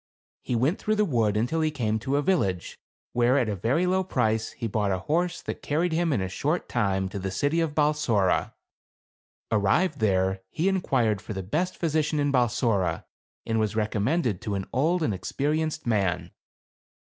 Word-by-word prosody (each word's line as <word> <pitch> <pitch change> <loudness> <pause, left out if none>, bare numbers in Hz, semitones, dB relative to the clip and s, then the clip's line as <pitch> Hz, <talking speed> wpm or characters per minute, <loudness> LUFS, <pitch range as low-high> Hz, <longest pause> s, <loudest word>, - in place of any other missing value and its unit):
He 125 - -2
went 135 - +1
through 215 - 0
the 210 0 +2
wood 115 - +1
until 125 +9 0
he 155 - +2
came 110 -7 -1
to 130 +5 -1
a 145 - +1
village, 100 - 0 0.3
where 125 +2 +3
at 125 -4 +2
a 105 - -1
very 120 - +1
low 185 +1 +2
price, 110 -10 0
he 120 - -5
bought 105 -2 0
a 95 - +1
horse 175 +3 0
that - - -5
carried 160 +3 0
him 165 0 +1
in 110 - +1
a 95 - -1
short 150 - -1
time 95 -5 0
to 100 - -5
the 95 0 -3
city 145 - 0
of 155 -3 -2
Balsora. 145 -11 +1 1.0
Ar 110 - +3
rived 145 - +2
there 95 -2 +1
he 165 - -1
inquired 130 - +1
for - - -6
the 95 -1 -4
best 160 - -1
physician 155 -2 0
in 145 0 +1
Balsora, 120 -6 +1 0.4
and 115 0 0
was 110 -1 0
recommended 110 - 0
to 105 - -3
an 95 -1 -3
old 165 +6 +2
and 110 - +1
experienced 155 - -2
man. 90 -7 0
120 Hz, 185 wpm, -26 LUFS, 105-155 Hz, 1.0 s, where